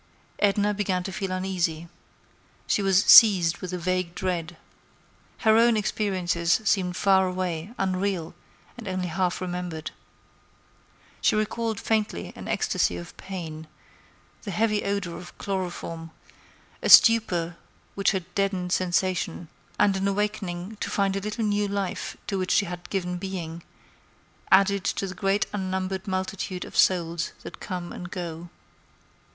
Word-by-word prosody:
Edna 205 0 +2
began 195 -3 -1
to 195 - -5
feel 190 0 -3
uneasy. 180 -3 -1 0.8
She - - +1
was 195 -1 +4
seized 180 -6 +8
with 185 - -6
a 180 - -2
vague 180 0 -1
dread. 175 -3 -3 0.8
Her 220 -1 +5
own 235 0 +5
like - - +2
experiences 180 -5 0
seemed 185 -3 +1
far 190 -2 +4
away, 180 +2 -3
unreal, 185 -3 -1 0.5
and 225 - -8
only 185 -1 -2
half 180 +1 0
remembered. 180 -3 -4 1.3
She - - +3
recalled 220 0 -1
faintly 210 - -1
an - - -9
ecstasy 85 - 0
of 85 - -9
pain, 160 -5 -7 0.7
the 210 - -7
heavy 210 +2 +1
odor 200 -4 -2
of 175 - -11
chloroform, 175 -4 -4 0.7
a - - -1
stupor 175 -8 +6 0.4
which 195 - +2
had 190 -4 -1
deadened 190 -2 -1
sensation, 180 -2 0 0.3
and 205 -1 +3
an 190 +1 0
awakening 200 -1 -2
to - - -3
find 195 -1 +1
a - - 0
little 210 +2 -2
new 205 0 +1
life 200 -2 -3
to 195 - -2
which 185 0 -2
she 205 - +3
had 175 -1 -7
given 180 -2 -2
being, 175 -3 -5 0.9
added 200 0 +5
to 195 - -1
the 185 - -5
great 195 +2 +1
unnumbered 190 0 -3
multitude 185 -1 -3
of - - -12
souls 170 -2 +2
that - - -9
come 180 -3 -5
and 180 - -7
go. 175 -2 -6
185 Hz, 140 wpm, -26 LUFS, 175-200 Hz, 1.3 s, seized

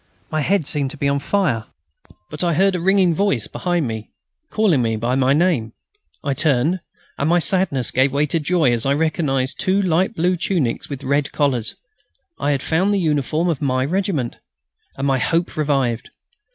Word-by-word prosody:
My 155 -1 0
head 175 +1 +1
seemed 140 -1 -1
to 150 - -8
be 140 - 0
on 140 0 +1
fire. 140 - 0 0.7
But 150 +2 -4
I 170 -2 +1
heard 195 +3 +3
a 180 - -1
ringing 190 0 +3
voice 160 - 0
behind 175 -5 -1
me, 110 -1 -5 0.4
calling 200 - +2
me 115 -1 0
by 115 +3 -1
my 130 0 +2
name. 145 -8 +1 0.5
I 140 - 0
turned, 150 +5 +1 0.4
and 145 - +1
my 175 - +4
sadness 170 - 0
gave 130 +1 +2
way 145 +2 +1
to 165 +3 -1
joy 155 -3 +2
as 115 -2 -1
I 140 +1 +2
recognised 145 -4 0
two 190 +1 +2
light 185 +2 +1
blue 180 +2 +1
tunics 160 -10 -1
with 140 -1 -6
red 140 +1 0
collars. 130 -6 0 0.6
I 145 - 0
had 140 -2 0
found 185 +5 +1
the - - +1
uniform 155 0 0
of 160 -5 -1
my 130 -2 +1
regiment! 170 - -1 0.6
and 135 - -2
my 135 -2 +2
hope 170 +6 0
revived. 135 -6 0
150 Hz, 185 wpm, -20 LUFS, 135-175 Hz, 0.7 s, my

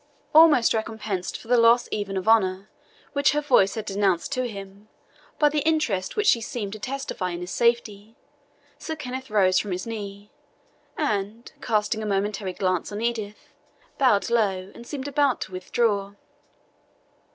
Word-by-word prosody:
Almost 305 -6 +6
recompensed 220 -4 -3
for - - -15
the 245 0 +4
loss 230 +1 +5
even 200 -2 -3
of 190 - -4
honour, 195 -2 +2 0.4
which 280 -1 +3
her 295 - +1
voice 250 -10 +3
had 220 - -4
denounced 195 -3 0
to 255 -1 -1
him, 200 -1 -10 0.5
by 300 - +4
the 300 +1 +1
interest 280 -12 0
which 425 - 0
she 235 - +4
seemed 215 -3 -5
to 215 - -7
testify 255 -6 -4
in 175 0 -5
his 180 - -6
safety, 225 -2 0 0.6
Sir 320 - -5
Kenneth 260 -3 -6
rose 185 -3 +3
from 205 - -4
his 180 0 -3
knee, 205 -2 -7 0.7
and, 215 -4 -2
casting 215 0 0
a 215 - -3
momentary 195 -1 -1
glance 185 -1 -1
on 205 - -4
Edith, 220 -3 -4 0.5
bowed 235 -5 +3
low, 195 -5 0
and 235 - -12
seemed 280 -2 -5
about 285 -2 +1
to - - -5
withdraw. 200 +2 -1
215 Hz, 160 wpm, -25 LUFS, 195-245 Hz, 0.7 s, Almost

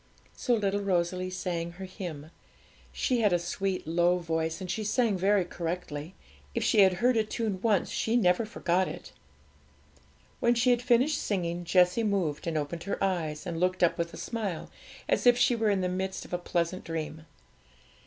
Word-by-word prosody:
So 245 - +1
little 200 -2 0
Rosalie 185 -1 0
sang 170 -2 -3
her 190 +2 -8
hymn. 170 -5 -7 0.6
She 250 -2 0
had 210 -3 +4
a 175 - +4
sweet 185 +2 -3
low 175 +2 +2
voice, 160 -1 -2
and 185 -2 -4
she 215 - -2
sang 220 0 +1
very 190 0 +2
correctly; 165 -2 -5 0.4
if - - 0
she 220 - +3
had 190 -2 +7
heard 240 +7 +2
a 220 - +3
tune 215 -3 -3
once 210 -5 +2
she 225 - 0
never 180 -2 +3
forgot 185 -4 0
it. - - -8 1.3
When 235 0 +3
she 245 +2 +3
had 240 -1 +2
finished 250 +5 +3
singing, 175 -3 -2
Jessie 180 +4 +4
moved, 180 -8 -1
and 160 -2 0
opened 160 +3 -4
her 200 - -2
eyes, 165 -5 -1
and 170 -2 -3
looked 185 +1 +1
up 170 -1 +3
with 170 0 -1
a - - -10
smile, 210 -8 -4 0.4
as - - +2
if 245 0 +7
she 245 0 +3
were 225 -2 +1
in 195 -2 +1
the 180 - 0
midst 190 +1 -3
of - - -12
a 175 - 0
pleasant 175 +1 -1
dream. 160 -1 -5
185 Hz, 185 wpm, -29 LUFS, 170-210 Hz, 1.3 s, had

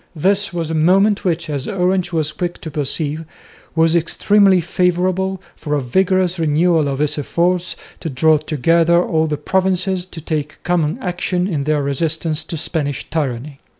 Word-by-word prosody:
This 195 +6 +1
was 165 -3 -3
a - - -1
moment 195 +6 +3
which, 170 -2 -1
as 145 -3 -3
Orange 185 -2 0
was 155 -3 -1
quick 175 +1 -4
to 160 - -6
perceive, 150 +1 -2 0.5
was 165 0 +3
extremely 190 +3 +3
favourable 180 +2 0 0.2
for 150 -2 -3
a - - +1
vigorous 185 +6 +1
renewal 160 0 +2
of 135 -1 -2
his 150 +1 0
efforts 175 +4 0 0.2
to 165 - -4
draw 155 +3 +3
together 165 +3 +2
all 160 -2 +1
the 150 -1 -2
provinces 185 +2 0
to 175 - -9
take 150 -2 -3
common 175 -1 0
action 180 0 -1
in 150 -8 -2
their 150 -1 +1
resistance 155 +3 -1
to 165 - -5
Spanish 145 -3 -3
tyranny. 140 -2 -3
165 Hz, 160 wpm, -18 LUFS, 150-180 Hz, 0.5 s, moment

